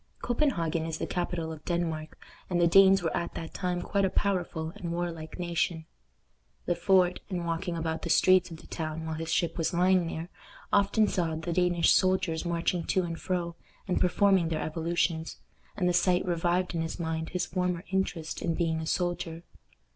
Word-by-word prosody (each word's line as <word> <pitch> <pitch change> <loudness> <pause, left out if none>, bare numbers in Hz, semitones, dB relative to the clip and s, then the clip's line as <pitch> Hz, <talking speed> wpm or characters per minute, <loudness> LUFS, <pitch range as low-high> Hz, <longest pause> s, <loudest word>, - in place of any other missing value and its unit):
Copenhagen 170 - 0
is 160 -1 -3
the - - -2
capital 175 -2 -2
of 155 -1 -9
Denmark, 165 -3 -2 0.3
and 175 -1 +1
the 175 - +5
Danes 195 +2 +6
were 165 - -1
at 170 - -3
that 165 - -6
time 180 -1 -2
quite 200 -1 0
a 190 - +3
powerful 175 -6 -1
and 175 -5 -5
warlike 170 -2 -4
nation. 170 -2 -1 0.8
Le 175 - +2
Fort, 180 0 +3
in 180 -3 -3
walking 170 +1 -2
about 160 0 -2
the - - -4
streets 185 -1 +5
of 165 - -8
the - - -15
town 160 -1 -4
while 160 - -3
his 160 +1 -4
ship 170 0 0
was 165 +1 0
lying 180 0 +3
there, 165 +1 -5 0.4
often 205 +2 +4
saw 165 -5 0
the 160 +2 -3
Danish 175 -1 +3
soldiers 185 -3 +2
marching 170 0 0
to 185 - +1
and 165 -1 -4
fro, 175 -2 -2 0.3
and 185 - 0
performing 185 -2 +3
their 155 -1 -1
evolutions, 165 0 -1 0.4
and 180 - +1
the 180 - +2
sight 180 +1 +3
revived 175 +1 0
in 165 - -1
his 165 +2 -4
mind 160 -1 -2
his 180 - -1
former 180 -1 -1
interest 180 -4 -2
in 165 -1 0
being 165 -2 0
a 160 - -4
soldier. 175 -2 -2
170 Hz, 185 wpm, -29 LUFS, 165-180 Hz, 0.8 s, Danes